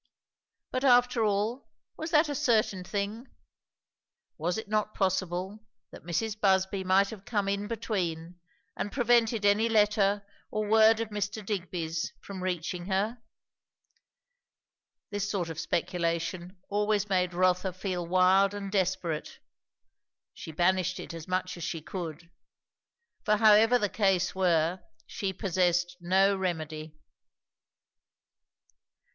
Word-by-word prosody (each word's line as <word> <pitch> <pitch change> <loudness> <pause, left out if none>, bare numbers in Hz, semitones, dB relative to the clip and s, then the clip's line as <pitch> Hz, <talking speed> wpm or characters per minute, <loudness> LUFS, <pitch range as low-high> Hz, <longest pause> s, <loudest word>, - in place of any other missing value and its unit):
But 255 +1 -2
after 245 -2 +4
all, 215 +5 -1 0.3
was 315 - -5
that 315 0 +4
a 290 - -2
certain 225 -9 +1
thing? 205 +6 -4 1.1
Was 175 +5 -2
it 220 - -5
not 215 0 -1
possible, 185 +2 -1 0.3
that - - -11
Mrs. 205 +6 -2
Busby 190 0 +2
might 190 +2 +3
have 210 -3 -10
come 205 -2 -1
in 200 +1 -1
between, 180 -7 -3 0.4
and 205 - -3
prevented 235 -3 +2
any 210 +3 +3
letter 205 -2 +2 0.2
or 215 0 -2
word 220 +1 +5
of 225 - -3
Mr. 205 0 -4
Digby's 175 -5 -3
from 195 -2 -8
reaching 180 -1 -3
her? 210 +5 -1 1.9
This 205 0 -2
sort 185 -5 -2
of 160 - -7
speculation 175 +1 -2
always 210 0 0
made 180 -2 0
Rotha 185 +1 +2
feel 185 -1 -3
wild 185 +3 +3
and 200 -1 -5
desperate; 185 -5 -1 1.0
she - - -9
banished 185 +2 +1
it - - -7
as 165 -2 -8
much 185 0 -2
as 170 - -7
she 165 0 -3
could; 165 0 -7 0.9
for 210 -1 +2
however 220 +3 +6
the 210 - 0
case 195 -3 +1
were, 175 -1 +1 0.2
she 195 +8 -3
possessed 180 -2 0
no 190 +3 +3
remedy. 155 -4 -4
195 Hz, 125 wpm, -29 LUFS, 180-210 Hz, 1.9 s, however